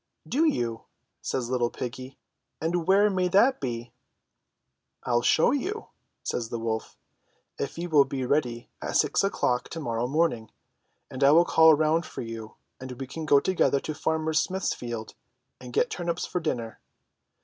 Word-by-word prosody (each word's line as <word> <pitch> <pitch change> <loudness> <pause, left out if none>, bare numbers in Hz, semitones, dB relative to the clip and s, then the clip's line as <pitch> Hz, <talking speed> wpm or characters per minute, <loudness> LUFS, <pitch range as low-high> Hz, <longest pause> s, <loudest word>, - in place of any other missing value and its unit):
'* - - -26
"Do 320 - +4
you," 120 - -1 0.4
says 125 -2 -3
little 120 -2 +1
piggy, 130 +3 -7 0.4
"and 165 +1 -1
where 200 +2 +5
may 185 -1 +1
that 215 +9 +4
be?" 120 -2 -4 1.1
"Til 120 -1 +2
show 160 - +4
you," 395 +11 -3 0.3
says 115 -2 -3
the 120 - -3
wolf; 110 -1 -3 0.6
"if 140 - -4
you 175 +1 -3
will 150 -4 +5
be 135 -1 -3
ready 125 -4 0
at - - 0
six - - +2
o'clock 125 -10 0
to 165 - -6
morrow 120 -4 -2
morning, 135 -6 0 0.6
I 135 +2 +3
will 165 +4 +6
call 160 -2 +6
round 155 +2 +1
for - - -6
you, 115 -1 -8 0.2
and 130 0 -7
we 135 - -4
can 155 +4 -7
go 145 -2 +6
together 155 -3 +2
to 155 - -4
Farmer 160 +1 -1
Smith's 185 +4 0
field 115 -2 -6 0.5
and 125 -1 -10
get 245 - +1
tur 175 - -4
nips 170 0 -1
for 180 - -2
dinner." 120 -9 -3
140 Hz, 170 wpm, -27 LUFS, 120-170 Hz, 1.1 s, will